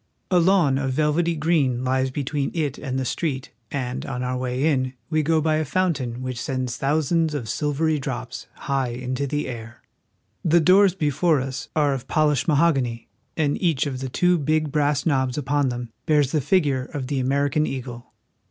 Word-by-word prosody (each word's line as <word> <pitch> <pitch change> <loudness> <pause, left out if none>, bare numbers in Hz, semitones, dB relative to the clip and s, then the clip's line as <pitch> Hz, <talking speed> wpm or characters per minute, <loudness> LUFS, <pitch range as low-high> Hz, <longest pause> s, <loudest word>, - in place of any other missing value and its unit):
A 180 - +5
lawn 170 -7 +3
of 135 -2 -1
velvety 155 +4 +1
green 145 -6 +1
Hes 130 +1 +1
between 140 +1 -2
it 150 -4 -1
and 130 -3 -3
the 130 - -1
street, 135 -1 -2 0.2
and 125 -3 -3
on 125 -2 -4
our 125 0 -1
way 125 +2 -1
in 130 -4 +1 0.2
we 155 0 +2
go 160 +1 +2
by 155 0 +1
a 155 - +1
fountain 135 -8 -1
which 130 -2 -4
sends 130 -4 -2
thou 150 +3 +2
sands 160 +1 +1
of 125 -6 -4
silvery 150 +5 0
drops 125 -3 -5 0.2
high 135 -2 0
into 125 +3 -3
the 145 +1 -2
air. 120 -1 -8 0.6
The 170 0 +4
doors 185 +3 +5
before 155 -1 +2
us 130 0 -5
are 145 -3 +3
of 130 -1 -5
polished 150 -4 +2
mahogany, 140 -7 +1 0.3
and 150 -3 0
each 165 -7 +2
of 135 -3 -3
the 135 0 -4
two 180 +6 +2
big 155 0 0
brass 145 -1 +1
knobs 130 -4 +1
upon 145 -1 +1
them 120 -1 -5 0.2
bears 150 -3 +3
the 155 - +1
figure 145 -4 +1
of 135 -1 -5
the 135 +1 -2
American 140 +3 +1
eagle. 125 -2 -6
140 Hz, 185 wpm, -23 LUFS, 130-155 Hz, 0.6 s, A